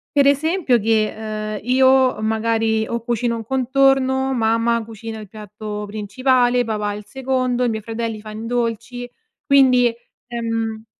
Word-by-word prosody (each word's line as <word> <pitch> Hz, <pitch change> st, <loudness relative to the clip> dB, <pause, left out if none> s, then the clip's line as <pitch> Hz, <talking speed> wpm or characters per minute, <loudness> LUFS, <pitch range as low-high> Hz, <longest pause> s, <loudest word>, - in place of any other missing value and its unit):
per 280 Hz, -1 st, +5 dB
esempio 290 Hz, -2 st, +2 dB
che, 220 Hz, 0 st, +1 dB
uhm, 215 Hz, -1 st, -5 dB
io, 260 Hz, 0 st, +4 dB
uhm, 215 Hz, -, -3 dB
magari 220 Hz, 0 st, 0 dB
o 235 Hz, 0 st, -3 dB
cucino 235 Hz, 0 st, -1 dB
un 225 Hz, -, -5 dB
contorno, 265 Hz, +1 st, +2 dB
mamma 230 Hz, 0 st, +1 dB
cucina 225 Hz, 0 st, -8 dB
il 210 Hz, -, -9 dB
piatto 210 Hz, +1 st, -7 dB
principale, 245 Hz, +4 st, +1 dB
papà 210 Hz, -2 st, -2 dB
il 210 Hz, +1 st, -7 dB
secondo, 255 Hz, +1 st, -1 dB
i -, -, +1 dB
miei 220 Hz, -1 st, -3 dB
fratelli 225 Hz, 0 st, -4 dB
fan 215 Hz, +1 st, -8 dB
i -, -, -6 dB
dolci, 240 Hz, +1 st, -3 dB, 0.4 s
quindi, 255 Hz, -4 st, +5 dB, 0.3 s
ehm 225 Hz, -2 st, -3 dB
230 Hz, 145 wpm, -20 LUFS, 220-255 Hz, 0.4 s, per